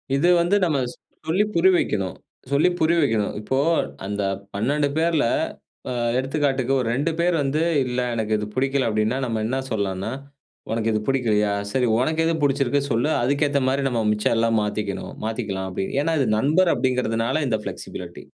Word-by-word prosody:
இது 170 +6 +3
வந்து 175 +4 +2
நம்ம 155 -4 +1 0.5
சொல்லி 185 +6 +3
புரிய 185 +3 +5
வைக்கணும் 95 -3 -1 0.4
சொல்லி 145 +6 +4
புரிய 160 +2 +3
வைக்கணும். 110 -7 0
இப்போ 130 +5 -1 0.5
அந்த 100 0 -2 0.3
12 140 +8 +1
பேர்ல, 160 -4 +2 0.6
அ - - -2 0.3
எடுத்துக்காட்டுக்கு 135 -1 0
ஒரு 120 - -1
2 150 +5 0
பேர் 175 0 +2
வந்து 145 +4 0 0.2
"இல்ல 125 0 -2 0.2
எனக்கு 110 -1 0
இது 105 0 -4
பிடிக்கல." 135 -1 +1
அப்படின்னா 110 +4 0
நம்ம 115 -2 -2
என்ன 130 +2 -1
சொல்லலாம்னா 100 0 -2 0.6
"உனக்கு 115 0 0
இது 110 - 0
பிடிக்கலையா 105 -6 +1 0.2
சரி, 125 -2 +1
உனக்கு 160 +5 +1
எது 165 0 +1
பிடிச்சிருக்கு 140 0 +2
சொல்லு, 120 +7 +1
அதுக்கேத்த 140 +1 +1
மாதிரி 135 +1 0
நம்ம 120 -3 0
மிச்சம் 105 +2 +1
எல்லாம் 115 -1 +2
மாத்திக்கணும் 105 -1 -3
மாத்திக்கலாம்." 95 -4 -3
அப்படின்னு 95 +8 -3
ஏன்னா 165 +1 0
இது 125 - +1
நண்பர் 165 +8 +3
அப்படிங்கிறதுனால 125 +2 0
இந்த 110 -3 0
ஃப்ளெக்ஸிபிலிட்டி. - - -7
130 Hz, 160 wpm, -23 LUFS, 110-145 Hz, 0.6 s, புரிய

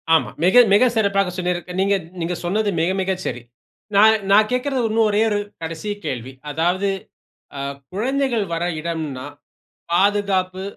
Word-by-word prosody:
ஆமாம். 160 - 0
மிக, 245 +7 +7
மிக 250 +5 +6
சிறப்பாக 195 -3 +1
சொன்னீர்ங்க. 180 0 -3
நீங்க 200 +1 +3 0.3
நீங்க 175 +1 -2
சொன்னது 205 +3 0
மிக, 170 - +1
மிக 190 0 0
சரி. 120 - -3 0.5
நான் 220 +2 +6
நான் 215 +1 +5
கேக்கறது 255 +1 0
இன்னும் 220 0 +3
ஒரே 210 +1 +2
ஒரு 205 - 0 0.2
கடைசி 165 +5 -5 0.2
கேள்வி. 130 0 -4 0.2
அதாவது, 175 +6 0 0.7
அ - - -4 0.3
குழந்தைகள் 245 0 0
வர 165 - -2 0.2
இடம்னா 155 -5 -4 0.7
பாதுகாப்பு, 190 -1 +1
195 Hz, 140 wpm, -21 LUFS, 175-215 Hz, 0.7 s, மிக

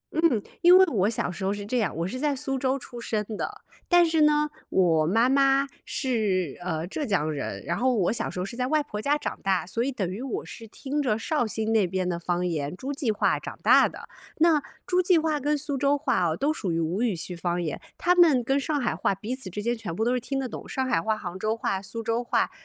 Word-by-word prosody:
嗯， 315 -10 +3 0.2
因 355 +1 +8
为 380 - +7
我 200 -3 +2
小 220 -5 -1
时 190 - -7
候 190 - +1
是 205 0 -4
这 245 +3 0
样， 195 -9 -1
我 170 +2 -1
是 255 - -5
在 295 0 +1
苏 270 0 -2
州 260 +1 +1
出 245 -2 -9
生 215 -2 -2
的。 420 - -5 0.3
但 350 -1 +6
是 320 -1 +2
呢， 300 0 +4 0.2
我 165 -4 +3
妈 225 +7 +3
妈， 275 +1 +3 0.2
是， 200 - -1
呃， 165 -2 -2
浙 290 - -4
江 170 - 0
人。 145 -2 -4
然 170 - -1
后 255 0 +2
我 185 -5 +2
小 225 0 -2
时 - - -6
候 180 - -1
是 235 - -7
在 250 +1 -1
外 305 0 +2
婆 210 -7 -6
家 290 +4 +2
长 - - -5
大， 190 -2 +1
所 230 +6 -2
以 275 - -1
等 205 -8 -2
于 195 +6 -5
我 265 -1 -4
是 225 -1 -10
听 285 +6 -3
着 220 -6 +1
绍 245 0 0
兴 220 +1 -2
那 210 -4 +3
边 185 0 -2
的 170 -1 -2
方 175 +1 -1
言 155 -3 -2
诸 270 +6 -4
暨 270 -5 0
话 210 - +1
长 - - -8
大 - - +6
的。 - - -11 0.3
那， 320 -2 +4 0.2
诸 365 0 +2
暨 360 -1 +4
话 315 -1 +1
跟 295 +2 +1
苏 290 0 -3
州 285 +1 +3
话 255 -9 +1
哦， 160 0 -1
都 295 +3 +1
属 195 - -3
于 165 - 0
吴 165 +6 -1
语 235 -6 +1
区 175 +2 -6
方 175 +1 -1
言， 160 -4 -4 0.2
他 355 - +3
们 325 -8 +5
跟 270 +4 +1
上 295 +1 -1
海 240 -4 -1
话 195 - 0
彼 215 +6 -4
此 260 -7 -7
之 205 +3 -5
间 235 +2 0
全 210 -8 -6
部 220 - 0
都 245 - +2
是 250 - +1
听 270 +3 -4
得 265 - -2
懂。 235 - -8
上 265 - -1
海 165 - +2
话、 220 +4 0
杭 180 -3 -6
州 215 +3 -1
话、 195 -3 -1
苏 230 +4 -6
州 230 +2 0
话， 240 - +1
230 Hz, 280 characters per minute, -26 LUFS, 185-275 Hz, 0.3 s, 因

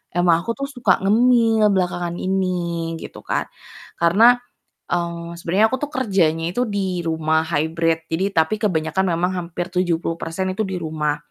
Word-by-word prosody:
emang 175 -2 +4
aku 230 +7 -3
tuh 275 0 -4
suka 235 -9 +1
ngemil 225 +1 +4
belakangan 175 -2 -1
ini 175 -3 -2
gitu 160 - -9
kan. - - -2 0.6
Karena, 220 +9 +5 0.5
eee, 170 -1 -2
sebenarnya 190 +6 +3
aku - - +2
tuh - - -21
kerjanya 190 - +1
itu 245 - 0
di 190 -3 -2
rumah 160 -1 +1
hybrid, 165 +1 0
jadi 165 +4 +1
tapi 160 +6 +2
kebanyakan 165 -3 0
memang 175 +1 0
hampir 175 +1 -5
70% 175 0 -1
itu 195 - -1
di 190 - -3
rumah, 155 -3 -2
175 Hz, 150 wpm, -21 LUFS, 165-195 Hz, 0.6 s, Karena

